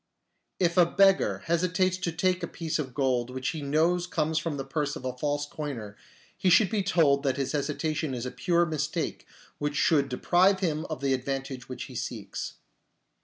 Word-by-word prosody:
If 175 -1 +1
a 175 - +8
beggar 195 +2 +3
hesitates 180 +2 +1
to 180 -2 -2
take 180 +2 +1
a - - -2
piece 160 -2 -3
of 130 -4 -4
gold 125 -3 +1
which 130 0 -3
he 155 - -4
knows 165 +5 +1
comes 160 -2 0
from 160 -2 -3
the 135 - -4
purse 145 +1 -2
of 130 - -8
a 130 -1 -3
false 145 +2 -1
coiner, 135 -9 -6 0.4
he 185 - +1
should 190 +2 +5
be 215 -2 +1
told 160 -7 +3
that 135 -2 0
his 135 -2 -1
hesitation 150 0 -1
is 120 0 -4
a 125 - -3
pure 175 -2 +2
mistake 155 0 -3 0.3
which 145 +4 +1
would 140 -3 +3
deprive 185 +9 +3
him 155 -4 0
of 155 -4 -5
the 135 -1 +2
advantage 135 -1 -4
which 130 - -5
he - - -10
seeks. - - -5
155 Hz, 190 wpm, -28 LUFS, 135-175 Hz, 0.4 s, a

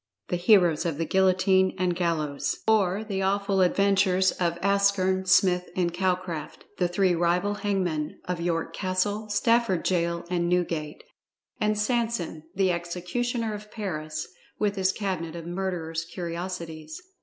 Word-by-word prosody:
THE - - 0
HEROES 175 -3 +4
OF 160 -4 -2
THE 165 - -1
GUILLOTINE 190 +1 +3
AND 180 -1 0
GALLOWS, 160 -5 -1
OR, 205 -2 +3
THE 200 -3 -3
AWFUL 195 0 +1
ADVENTURES 190 0 +3
OF 170 -1 -1
Askern, 200 -1 +2
Smith 180 -1 +4
and 175 -2 0
Calcraft, 180 -3 -2
the 180 - +3
Three 180 +1 +2
Rival 175 +4 +1
Hangmen 185 -7 -1
Of 180 -1 -3
York 170 -1 -1
Castle, 205 +3 -1
Stafford 230 -3 +2
Gaol 170 -1 0
and 175 -1 0
Newgate; 170 - -1 0.6
And 215 0 +1
SANSON, 225 -7 -1
the 190 -1 +3
Executioner 200 +7 -2
of 210 0 -8
Paris, 155 -8 -4 0.3
With 205 -1 0
his 190 -1 +2
Cabinet 185 -5 -3
of 165 -1 -7
Murderer's 175 -3 -3
Curiosities. 170 - -6
185 Hz, 135 wpm, -26 LUFS, 170-200 Hz, 0.6 s, HEROES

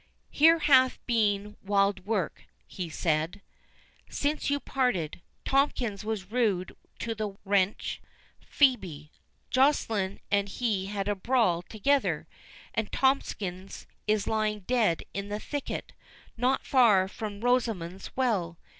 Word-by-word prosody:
"Here 325 +3 +6
hath 265 -5 +4
been 210 -3 0
wild 200 -1 +1
work," 205 -7 -2 0.2
he 180 -3 -6
said, 160 +2 -1 0.7
"since 295 +1 -1
you 285 0 +1
parted. 215 - -1 0.2
Tomkins 255 -7 +1
was 215 -3 -4
rude 210 -7 0 0.2
to 230 - -3
the 215 -2 -4
wench 195 0 +1 0.4
Phœbe—Joceline 215 - 0
and 200 0 +2
he 205 -4 -1
had 200 -1 -3
a 205 - +2
brawl 205 -4 +1
together, 270 +9 0 0.5
and 220 -1 -2
Tomkins 195 -8 -1 0.2
is 210 -1 +2
lying 215 -1 0
dead 215 -5 +1
in 200 +1 -4
the 210 +1 -3
thicket, 290 +5 -5 0.4
not 250 +3 +1
far 215 -8 +5
from 205 0 -6
Rosamond's 220 -8 0
Well. 200 -10 0
210 Hz, 115 wpm, -28 LUFS, 190-250 Hz, 0.7 s, Here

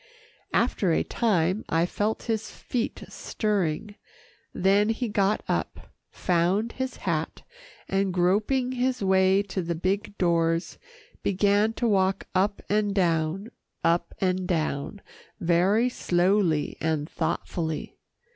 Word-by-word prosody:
After 210 -6 +2
a - - +2
time 190 -3 +1
I 165 +1 +2
felt 210 +4 -2
his 220 -2 -2
feet 240 -2 -4
stirring, 205 -2 -2 0.6
then 200 +3 +3
he 230 +2 -1
got 205 -1 +1
up, - - -3 0.2
found 185 +6 +1
his 260 0 -4
hat, - - -2 0.4
and 195 0 +1
groping 210 +9 +1
his 255 -2 -1
way 190 +1 +4
to 190 -1 -3
the 170 0 -2
big 195 +4 -2
doors, 165 -1 +1 0.4
began 205 +3 +2
to 240 - -1
walk 195 -2 +2
up 200 +2 +1
and 205 -1 +1
down, 175 +3 0 0.3
up 170 +1 +1
and 185 -1 0
down, 160 +2 -2 0.4
very 185 +7 +3
slowly 180 -7 +1
and 155 -2 0
thoughtfully. 160 -2 -3
195 Hz, 120 wpm, -26 LUFS, 175-210 Hz, 0.6 s, way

